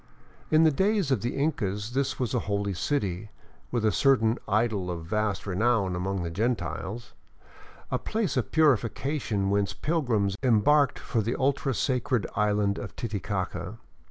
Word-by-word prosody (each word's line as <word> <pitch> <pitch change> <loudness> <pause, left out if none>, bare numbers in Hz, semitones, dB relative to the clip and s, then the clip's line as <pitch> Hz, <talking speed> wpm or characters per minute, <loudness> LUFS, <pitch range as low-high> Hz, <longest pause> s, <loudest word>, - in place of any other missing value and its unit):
In 155 +1 +5
the 160 - +5
days 190 0 +1
of 125 -7 +2
the 120 - -2
Incas 105 -8 -1
this 135 +1 -1
was 125 -4 -1
a - - +2
holy 100 -1 0
city, 100 -3 -2 0.4
with 120 -3 -1
a 110 - +4
certain 120 -4 +3
" - - -33 0.2
idol 100 -6 -2
of 85 -2 -4
vast 105 +1 -1
renown 100 -1 +1
among 95 +1 -2
the 85 - -4
Gentiles," 115 +2 -3 0.8
a - - 0
place 220 -4 -1
of - - -1
purification 125 -6 +1
whence 100 -1 +1
pilgrims 120 - 0
em 120 -5 +4
barked 145 +2 +4
for 115 - -1
the 115 +3 -1
ultra 135 -1 0
sacred 125 -2 0
island 105 -1 +1
of - - -7
Titicaca. 100 -4 -4
110 Hz, 155 wpm, -27 LUFS, 100-135 Hz, 0.8 s, In